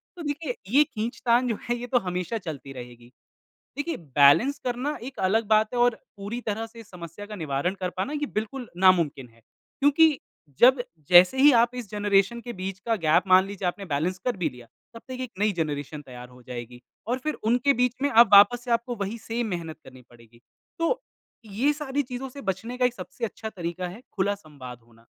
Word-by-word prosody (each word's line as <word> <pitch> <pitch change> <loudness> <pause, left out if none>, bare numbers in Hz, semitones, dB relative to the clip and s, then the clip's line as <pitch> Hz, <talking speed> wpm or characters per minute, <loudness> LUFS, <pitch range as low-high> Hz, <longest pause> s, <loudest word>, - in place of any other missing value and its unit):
तो 350 - -9
देखिए, 290 -3 -3
ये 280 +7 +6
खींचतान 240 0 0
जो 225 -3 -1
है, 240 - +1
ये 240 +1 -6
तो 245 - +2
हमेशा 180 +1 -3
चलती 150 -8 -7
रहेगी। 120 -1 -11 0.7
देखिए, 330 +3 -2
बैलेंस 145 - +4
करना 255 +4 -2
एक 265 +2 -8
अलग 215 +4 +2
बात 215 +1 +3
है 245 - -1
और 240 -1 +4 0.2
पूरी 205 +4 -5
तरह 220 0 -3
से 230 +1 -14
इस 220 -2 -13
समस्या 175 +2 -9
का 210 0 -8
निवारण 155 0 -2
कर 185 -1 -2
पाना 220 +11 -2
ये 295 -1 -1
बिल्कुल 225 +4 -4
नामुमकिन 170 -8 +3
है। 115 0 -25 0.4
क्योंकि 290 +1 +4 0.4
जब 255 +1 +6 0.3
जैसे 180 +7 +7
ही 285 +2 +7
आप 240 +1 0
इस 240 -5 -6
जनरेशन 205 +2 +1
के 240 0 -7
बीच 190 0 -5
का 230 -1 +1
गैप 160 -5 +3
मान 185 0 +6
लीजिए, 195 -2 -4
आपने 195 +3 -4
बैलेंस 165 +4 -1
कर 245 -4 0
भी 180 - 0
लिया, 125 -1 -14 0.3
तब 230 - -11
तक 255 -1 -7
एक 255 -3 -5
नई 210 +1 +2
जनरेशन 150 -3 -3
तैयार 125 -3 -11
हो 125 0 -17
जाएगी 120 0 -8 0.3
और 245 +2 0
फिर 305 - -1
उनके 245 +5 +3
बीच 250 -1 +1
में 285 - +2
अब 235 0 +7
वापस 240 +5 +7
से 245 - -3
आपको 235 +1 0
वही 205 +1 -4
सेम 230 +1 -3
मेहनत 170 -5 -5
करनी 130 -1 -14
पड़ेगी। 115 -1 -20 0.4
तो 335 +10 0 0.4
ये 220 +8 +1
सारी 290 -1 -2
चीज़ों 255 +1 -6
से 280 +2 -10
बचने 215 +5 -4
का 250 - +2
एक 250 - +1
सबसे 240 -1 -6
अच्छा 220 0 -7
तरीक़ा 175 -2 -5
है, 185 +7 -10
खुला 200 0 0
संवाद 140 - -11
होना। 115 0 -23
210 Hz, 205 wpm, -25 LUFS, 170-245 Hz, 0.7 s, जैसे